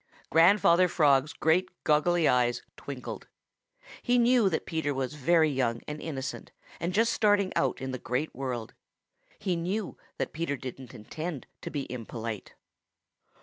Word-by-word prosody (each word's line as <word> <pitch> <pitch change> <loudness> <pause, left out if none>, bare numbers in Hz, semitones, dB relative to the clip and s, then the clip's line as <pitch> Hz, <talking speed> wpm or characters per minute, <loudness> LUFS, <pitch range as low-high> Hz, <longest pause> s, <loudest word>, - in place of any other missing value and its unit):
Grandfather 175 +2 +6
Frog's 145 -4 +3
great 180 +2 +2
goggly 160 +2 +3
eyes 120 -1 +2
twinkled. 135 -3 -7 0.7
He 245 0 +2
knew 240 -3 +4
that 160 - -2
Peter 155 -4 -2
was 130 +1 -2
very 155 +2 +3
young 120 -4 0
and 150 0 -5
innocent 135 -4 -5 0.3
and 170 +2 -1
just 225 +4 +2
starting 205 -3 +2
out 135 - +1
in 130 0 -4
the 130 - -4
Great 130 +7 -2
World. 125 -4 -4 0.6
He 190 -4 -1
knew 185 +5 -3 0.2
that - - -3
Peter 155 -3 -2
didn't 130 -1 -8
intend 150 +7 -6 0.2
to - - -5
be 145 -2 -3
impolite. 115 -3 -6
150 Hz, 145 wpm, -29 LUFS, 130-175 Hz, 0.7 s, Grandfather